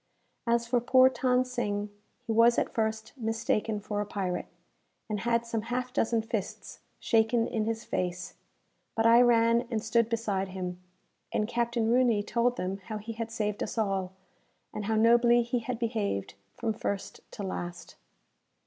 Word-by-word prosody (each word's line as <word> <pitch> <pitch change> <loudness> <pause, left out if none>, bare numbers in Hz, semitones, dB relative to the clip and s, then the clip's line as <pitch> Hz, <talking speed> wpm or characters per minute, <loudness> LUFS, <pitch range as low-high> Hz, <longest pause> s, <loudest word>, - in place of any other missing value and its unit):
As 235 0 +2
for 240 0 +1
poor 255 +2 +6
Than 255 -1 +2
Sing, 210 -5 -2 0.3
he 230 - -2
was 230 +2 +5
at - - 0
first 220 0 -2
mistaken 225 -2 -1
for 205 0 -3
a - - -2
pirate, 185 -4 -3 0.6
and 210 -2 -2
had 235 +2 +1
some 230 -1 -2
half 250 +3 -3
dozen 230 -4 +1
fists 220 -3 -5 0.2
shaken 230 0 +2
in 220 -2 -1
his 225 0 -2
face; 180 0 -3 0.6
but 225 - +1
I 230 +1 +7
ran 235 0 +4
and 230 -3 0
stood 230 0 +2
beside 210 -4 -1
him, 180 -1 -5 0.5
and 210 - 0
Captain 235 -1 0
Rooney 240 -4 +3
told 240 +3 +1
them 185 +1 -2
how 215 - -4
he 220 +2 -6
had 230 0 -4
saved 210 -2 -2
us - - -3
all, 195 -4 -1 0.6
and 210 - -4
how 220 +1 0
nobly 235 +2 +5
he 240 +1 -1
had 235 +1 -4
behaved 220 - -2 0.2
from 225 -2 -1
first 200 -2 -4
to 205 - -6
last. 175 -2 -5
225 Hz, 165 wpm, -29 LUFS, 210-235 Hz, 0.6 s, I